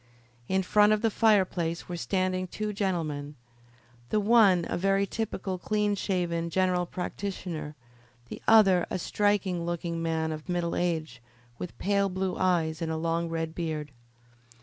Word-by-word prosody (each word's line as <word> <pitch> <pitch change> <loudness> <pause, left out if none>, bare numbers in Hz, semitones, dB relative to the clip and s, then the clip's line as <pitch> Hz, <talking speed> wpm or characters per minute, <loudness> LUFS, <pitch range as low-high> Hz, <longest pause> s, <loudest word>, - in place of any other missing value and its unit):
In 190 0 +1
front 210 +3 +4
of 215 +1 -1
the 225 - +3
fireplace 185 -7 +2
were 175 - -4
standing 185 +1 -1
two 210 +3 -4
gentlemen, 155 -7 -2 0.7
the 215 - +2
one 205 -5 +5
a - - -2
very 195 +2 +2
typical, 195 -3 -4
clean 210 +1 0
shaven, 175 -4 -1
general 180 0 +1
practitioner, 180 -5 -5 0.5
the - - -8
other 195 -5 +6
a - - -2
striking 195 -2 0
looking 170 -1 -3
man 160 -1 -1
of 155 +3 -7
middle 175 -1 -1
age, 160 -8 -2 0.4
with 180 - -7
pale 200 0 +1
blue 185 0 -2
eyes 165 -4 +1
and 160 -1 -1
a 160 - -2
long 165 +1 -1
red 165 -1 -3
beard. 155 -4 -4
180 Hz, 150 wpm, -28 LUFS, 165-195 Hz, 0.7 s, other